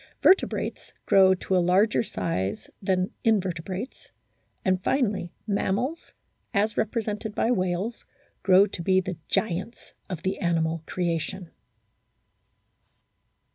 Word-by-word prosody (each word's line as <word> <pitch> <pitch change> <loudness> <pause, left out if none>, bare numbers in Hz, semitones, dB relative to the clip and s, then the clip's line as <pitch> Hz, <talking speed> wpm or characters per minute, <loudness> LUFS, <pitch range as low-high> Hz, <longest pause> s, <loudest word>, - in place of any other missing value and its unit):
Vertebrates 385 - +2
grow 190 -1 +6
to 190 +1 -2
a 180 - +4
larger 190 +5 +3
size 100 - -3
than 185 -1 0
Invertebrates, 190 0 -1 0.6
and 185 0 +1
finally 205 -10 0
Mammals, 215 - -1 0.4
as 210 +2 +2
represented 215 -1 -2
by 235 - +2
whales, 185 +2 -1 0.4
grow 190 +1 +6
to 190 -3 -6
be 185 +2 +3
the 185 -2 -4
giants 205 +4 -2 0.2
of 180 -3 -5
the 190 - -1
animal 165 -2 0
creation. 175 0 -2
190 Hz, 105 wpm, -26 LUFS, 180-210 Hz, 0.6 s, grow